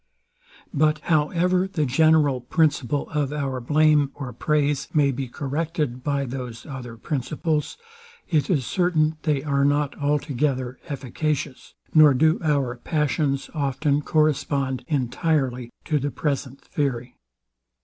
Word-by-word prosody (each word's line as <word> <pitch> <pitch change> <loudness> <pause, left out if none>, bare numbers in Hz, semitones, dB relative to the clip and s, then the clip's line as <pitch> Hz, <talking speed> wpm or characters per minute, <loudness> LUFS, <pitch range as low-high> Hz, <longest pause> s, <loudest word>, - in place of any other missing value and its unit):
But 155 0 +3
however 175 +4 +2
the 170 -6 -1
general 145 -1 +3
principle 140 0 +1
of 145 -3 -1
our 135 -3 -2
blame 150 +2 +3
or 130 -4 -6
praise 145 +2 0
may 145 -2 +4
be 135 0 -4
corrected 145 -1 -3
by 140 -1 0
those 125 -3 -6
other 125 -5 -8
principles, 150 - -2 0.5
it 155 -5 +1
is 145 -9 +1
certain, 160 -3 +1
they 145 -4 0
are 140 -2 +1
not 145 0 +1
altogether 140 -3 -1
efficacious, 140 +1 -3 0.2
nor 155 -3 +7
do 155 +4 +3
our 140 -6 0
passions 145 0 -1
often 145 0 0
correspond 140 -4 0
entirely 130 -2 0 0.2
to 150 -2 +1
the 145 +2 -1
present 140 -2 -3
theory. 125 -4 -3
145 Hz, 120 wpm, -24 LUFS, 130-155 Hz, 0.5 s, nor